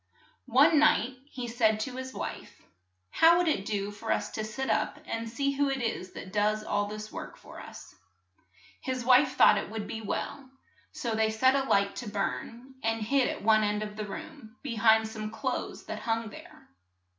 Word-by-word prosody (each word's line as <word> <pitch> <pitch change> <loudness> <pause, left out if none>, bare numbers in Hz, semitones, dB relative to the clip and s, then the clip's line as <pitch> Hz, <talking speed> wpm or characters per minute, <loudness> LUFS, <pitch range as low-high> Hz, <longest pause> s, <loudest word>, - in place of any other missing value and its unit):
One 310 - +5
night 300 -4 +4 0.2
he 250 -4 -5
said 225 -2 +2
to 255 +2 -4
his 260 0 -5
wife, - - -7 0.5
"How 335 +1 +6
would 355 -1 +2
it 200 -11 0
do 205 -1 -2
for 210 +2 -5
us - - 0
to 215 - -3
sit 240 +5 -4
up - - 0
and 225 0 -4
see 275 +5 0
who 280 0 +1
it 270 -1 -1
is 220 -6 -3
that 185 - -9
does 210 +1 +1
all 205 -1 0
this 215 +1 -7
work - - -8
for - - -12
us? - - -11 0.4
" 95 +4 -29
His 255 -2 -3
wife 255 +1 +5
thought 210 - +6
it - - -6
would 215 -1 -4
be 225 +2 -5
well, 260 +5 -4 0.4
so 235 -2 -3
they 220 0 +2
set 260 +4 +3
a 270 -1 +1
light 200 0 +2
to 235 - -5
burn, 230 +5 -4
and 225 0 0
hid 270 +3 +2
at - - -5
one 215 0 +5
end 210 0 0
of 210 0 -7
the 215 0 -4
room, 220 +2 -9
be 275 -5 -3
hind 220 0 +5
some 215 -1 -5
clothes 220 - -4
that - - -5
hung 225 -1 -2
there. - - -13
220 Hz, 200 wpm, -29 LUFS, 210-260 Hz, 0.5 s, How